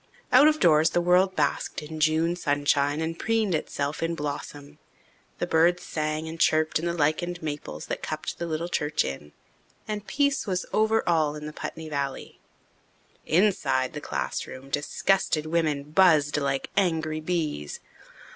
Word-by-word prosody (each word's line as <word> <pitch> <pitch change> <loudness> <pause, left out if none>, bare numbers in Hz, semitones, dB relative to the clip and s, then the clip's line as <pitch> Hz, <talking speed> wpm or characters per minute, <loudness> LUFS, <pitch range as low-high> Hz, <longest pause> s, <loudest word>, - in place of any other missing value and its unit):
Out 265 +4 +7
of 310 0 +3
doors 160 -2 +5
the 175 - +1
world 180 +2 +3
basked - - -1
in 155 +1 -7
June 160 +2 +2
sunshine 145 -2 +1
and 165 +1 -3
preened 225 -4 +1
itself 145 -1 -2
in 165 0 -1
blossom. 145 0 -6 0.6
The - - -1
birds 170 +2 +3
sang 155 0 -3
and 165 +1 -7
chirped 155 0 +3
in 170 - -2
the 170 - 0
lichened 165 +2 -1
maples 145 - -5
that - - -4
cupped - - -5
the 170 - -3
little 165 +1 -2
church 150 -3 0
in, 75 +2 -6 0.6
and 210 -1 -4
peace 280 -4 +1
was 185 -2 -1
over 220 +1 +2
all 160 -4 +2
the 150 0 -7
Putney 160 +1 -6
valley. 140 -3 -4 0.9
Inside 165 -8 +2
the - - -6
classroom 135 +1 -5
disgusted 155 +2 +1
women 155 -3 -1
buzzed 155 -5 +4
like 140 -2 -1
angry 160 -5 0
bees. 155 - -3
160 Hz, 150 wpm, -26 LUFS, 150-175 Hz, 0.9 s, Out